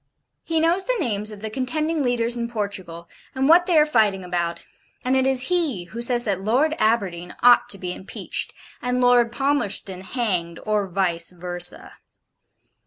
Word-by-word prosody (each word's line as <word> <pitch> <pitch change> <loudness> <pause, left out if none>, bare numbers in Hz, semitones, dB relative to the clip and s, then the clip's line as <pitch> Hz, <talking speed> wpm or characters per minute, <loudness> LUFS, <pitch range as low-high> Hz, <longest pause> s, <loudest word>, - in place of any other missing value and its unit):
He 325 -1 0
knows 340 +4 +2
the - - 0
names 215 - -1
of 210 -2 -7
the 220 0 -5
contending 305 +6 -1
leaders 240 -2 +1
in 235 -1 -3
Portugal, 190 -6 -5 0.3
and 265 +1 +1
what 345 +3 +6
they 350 -3 +3
are 300 - +6
fighting 215 -9 +2
about: 170 -1 -3 0.4
and 255 +1 +2
it 265 0 +2
is 265 +2 +2
he 320 - 0
who 220 +7 -8
says 240 0 +2
that 195 -4 -2
Lord 255 +10 +2
Aberdeen 195 -6 0
ought 245 0 +6
to 200 - 0
be 180 -1 -4
impeached, 190 - -5 0.3
and 250 0 -1
Lord 245 -1 +4
Palmerston 240 -9 -1
hanged, 185 -7 -2
or 210 -2 0
VICE 175 -3 0
VERSA. 175 0 -4
230 Hz, 170 wpm, -23 LUFS, 190-265 Hz, 0.4 s, what